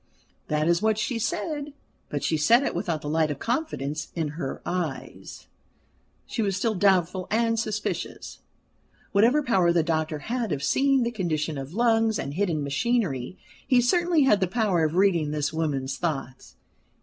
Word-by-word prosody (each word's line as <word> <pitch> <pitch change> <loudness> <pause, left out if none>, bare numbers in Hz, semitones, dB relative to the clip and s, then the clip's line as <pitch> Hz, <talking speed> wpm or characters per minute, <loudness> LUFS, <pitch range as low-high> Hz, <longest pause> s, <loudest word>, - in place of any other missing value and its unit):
That 150 +1 0
is 170 +1 +2
what 220 -1 +2
she 230 +2 -1
said; 290 +7 -3 0.4
but 145 - -3
she 160 - +1
said 230 - +4
it - - -1
without 170 -3 -2
the - - -5
light 155 +1 +1
of 145 - -3
confidence 155 - -2
in 160 -3 -1
her 145 -2 -5
eyes 175 -6 -5 0.8
she 230 - -3
was 195 -3 0
still 220 +3 0
doubtful 185 -2 +2
and 230 +1 +1
suspicious. 215 -2 -4 0.7
Whatever 235 +9 +4
power 190 -9 +3
the 170 -1 +2
doctor 155 -1 -1
had 230 - -3
of 140 -2 -2
seeing 270 - +3
the 235 - -1
condition 160 -7 -2
of 135 +5 -7
lungs 225 -1 +2
and 140 - -4
hidden 170 -4 0
machinery, 160 - -1 0.3
he 255 -3 +5
certainly 340 +5 +3
had 210 -7 +4
the 190 - +1
power 195 -4 +1
of 155 +1 0
reading 180 -5 +3
this 150 +1 -2
woman's 140 -4 -2
thoughts. 135 -6 -4
180 Hz, 165 wpm, -26 LUFS, 155-230 Hz, 0.8 s, he